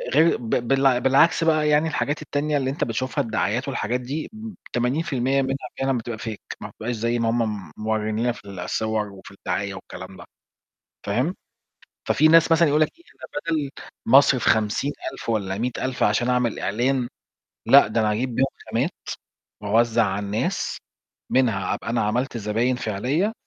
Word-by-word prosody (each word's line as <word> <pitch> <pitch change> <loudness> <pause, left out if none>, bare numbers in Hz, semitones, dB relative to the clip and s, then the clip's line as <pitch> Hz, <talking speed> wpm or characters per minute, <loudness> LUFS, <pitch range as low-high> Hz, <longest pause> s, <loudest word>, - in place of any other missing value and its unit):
غير 160 +2 +5
ب 115 -2 -7 0.2
بالع 135 -2 +4
بالعكس 140 +6 +4
بقى 155 -2 +3
يعني 150 +2 +3
الحاجات 150 0 -1
التانية 150 0 -1
اللي 135 -1 -1
أنت 140 - -2
بتشوفها، 120 +2 -1
الدعايات 115 +3 -1
والحاجات 125 -2 -1
دي 145 +5 -4
م-– 220 -1 -8 0.2
80% 135 +1 +1
منها 135 +1 -1 0.2
فعلًا 135 -1 +1
بتبقى 115 -1 -5
fake، 110 -3 -5 0.2
ما - - -6
بتبقاش 120 +2 -4
زي 115 +2 0
ما 115 -1 +1
هم 120 +1 +1 0.3
م - - -16
موريين 110 0 -1
لنا 120 +1 +2
في 110 - -11
الصور 105 +3 -2
وفي 95 0 -13
الدعاية 100 0 -3
والكلام - - -10
ده، - - -11 0.8
فاهم، 125 - 0 0.7
ففي 155 - +4
ناس 165 +1 +6
مثلًا 165 0 +5
يقول 150 +2 +3
لك 155 - +4
إيه، 340 - -22
أنا - - -11 0.3
بدل 140 -2 -2 0.4
ما 130 +4 +7
أصرف 130 -4 +2
50000 110 +4 0
والَّا 100 -3 -1
100000 125 +2 -2
عشان 120 +4 +2
أعمل 125 -2 +1
إعلان، 120 +5 0 0.6
لأ، - - +7
ده 110 +1 0
أنا 105 - +2
هاجيب 120 +2 -2
بيهم 135 - +3 0.2
خامات 125 +10 0 0.7
وأوزَّع 115 +2 +3
على 100 +1 -2
الناس، 105 +2 -1 0.5
منها 110 -8 +2
أبقى 115 - -5
أنا 120 - +1
عملت 120 +4 -1
زباين 115 +4 0
فعلية، 130 - -1
120 Hz, 170 wpm, -23 LUFS, 110-140 Hz, 0.8 s, ما